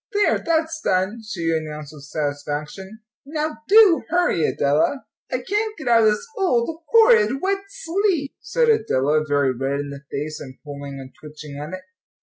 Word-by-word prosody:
"There, 410 0 +2
that's 320 -1 -1
done," 190 +5 0
she 175 -6 -3
announced 150 -2 -5
with 145 -2 -12
satisfaction; 150 +8 -4 0.2
"now 300 +2 -3
do 410 -5 +6
hurry, 350 - +2
Adela." 150 - +1 0.3
"I 255 - -1
can't 425 - -1
get 305 -6 -8
out 230 -2 +5
of - - +7
this 210 - -1
old, 325 - 0
horrid, 265 - +5
wet 395 +3 -1
sleeve," 345 -5 -1
said 485 -1 0
Adela, 155 - +2
very 145 -3 +1
red 135 +3 -2
in 145 0 -4
the 140 0 -8
face, 150 +2 -4
and 130 -2 -10
pulling 140 -2 -7
and 130 -1 -11
twitching 150 -1 -10
at 150 +4 -7
it. 185 0 -7
205 Hz, 165 wpm, -22 LUFS, -, 0.3 s, of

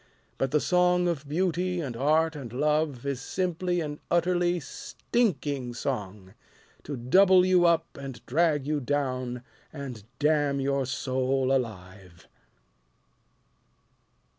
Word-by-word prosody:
But 135 - +1
the 150 - +2
song 180 +1 +2
of 150 -4 -3
Beauty 180 +2 0
and 135 -7 -4
Art 155 +5 +2
and 130 -6 -7
Love 150 0 0
Is 140 -3 -2
simply 180 +2 -1
an 150 -1 -5
utterly 175 0 +2
stinking 145 - -2
song, 100 -7 -4 0.5
To 145 -2 -5
double 185 +9 +5
you 180 -2 +4
up 165 -3 0
and 135 -4 -8
drag 150 0 +1
you 150 0 0
down 130 -3 -2 0.3
And 135 -8 -7
damn 145 -1 +2
your 135 -1 0
soul 130 0 0
alive. 95 -7 -6
145 Hz, 115 wpm, -27 LUFS, 130-170 Hz, 0.5 s, double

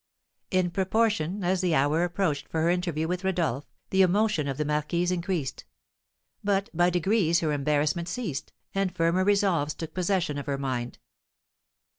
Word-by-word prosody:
In 185 -2 +1
proportion 195 -1 0
as 185 +1 +1
the 175 -3 +2
hour 145 +4 +2
approached 175 -5 -1
for 160 -1 -1
her 170 - +3
interview 170 -3 -1
with 180 +2 -2
Rodolph, 165 -8 -1 0.2
the 190 - +4
emotion 190 -4 +2
of 135 -1 -3
the 150 - -1
marquise 150 +4 0
increased; 175 -5 -2 0.8
but 200 -1 0
by 175 +2 +3
degrees 175 -1 +2
her 155 -2 0
embarrassment 150 +4 0
ceased, 185 - -4 0.2
and 195 -1 0
firmer 170 +2 +2
resolves 190 -7 +2
took 165 - -7
possession 180 -5 0
of 140 - -7
her 140 -1 -1
mind. 125 -3 -3
175 Hz, 155 wpm, -27 LUFS, 150-190 Hz, 0.8 s, the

